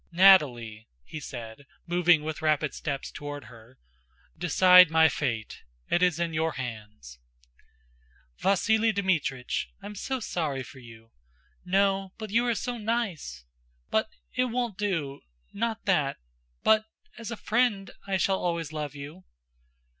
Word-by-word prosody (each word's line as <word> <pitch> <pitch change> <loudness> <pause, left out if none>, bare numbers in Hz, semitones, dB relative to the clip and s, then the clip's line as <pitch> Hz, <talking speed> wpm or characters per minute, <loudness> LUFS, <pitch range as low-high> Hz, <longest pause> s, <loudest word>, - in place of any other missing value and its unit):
"Nataly," 130 - +4 0.2
he 155 - -8
said, 120 -1 -9 0.2
moving 175 -2 +3
with 155 0 -5
rapid 155 -1 +1
steps 140 -2 -4
toward 145 -1 -7
her, 120 +1 -16 0.6
"decide 180 +1 +7
my 160 0 +5
fate. 115 -9 -3 0.3
It 175 - +3
is 180 -2 +2
in 170 -1 -1
your 160 0 0
hands." 105 - -8 1.2
"Vasíli 220 +3 +2
Dmítrich, 165 -10 -1
I'm 205 +1 -8
so 260 +6 -3
sorry 155 - -2
for 130 - -13
you!... 115 -2 -15 0.5
No, 195 0 +1
but 215 -2 -7
you 235 +3 +2
are 235 - +1
so 245 +2 -4
nice... 200 - -3 0.5
but - - +1 0.2
it 255 - +1
won't 240 -3 -2
do...not 165 - -4
that... 150 -8 +1 0.5
but 215 0 +4 0.3
as 230 - -6
a 230 - -5
friend, 215 -4 0 0.2
I 195 -1 +1
shall 190 +1 +1
always 170 -3 -2
love 150 -2 -4
you." 140 -8 -10
165 Hz, 130 wpm, -27 LUFS, 135-200 Hz, 1.2 s, decide